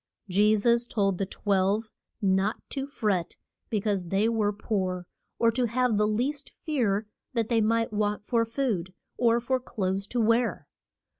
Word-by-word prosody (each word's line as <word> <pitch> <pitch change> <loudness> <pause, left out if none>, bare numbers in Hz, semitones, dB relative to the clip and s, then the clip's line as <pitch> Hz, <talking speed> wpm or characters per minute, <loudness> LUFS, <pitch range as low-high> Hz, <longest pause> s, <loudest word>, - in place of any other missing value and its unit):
Je 205 +3 +4
sus 235 +3 +2
told 195 -5 0
the 195 - -1
twelve 200 +2 0 0.3
not 195 +3 +2
to 275 -1 -3
fret 205 -10 -1 0.3
be 215 - +1
cause 200 -3 -1
they 195 +5 +2
were 220 -3 +1
poor, 185 -4 -2 0.3
or 230 -1 +4
to 245 +2 +1
have 245 0 +1
the 210 0 +3
least 265 +7 -1
fear 225 -9 -1 0.3
that 230 -3 0
they 230 -2 +3
might 225 +1 +1
want 210 0 -1
for 230 0 +2
food, 225 -7 -2 0.2
or 235 -1 +4
for 255 +2 0
clothes 195 -5 -2
to 245 - -2
wear. 230 +1 +2
215 Hz, 160 wpm, -27 LUFS, 200-235 Hz, 0.3 s, Je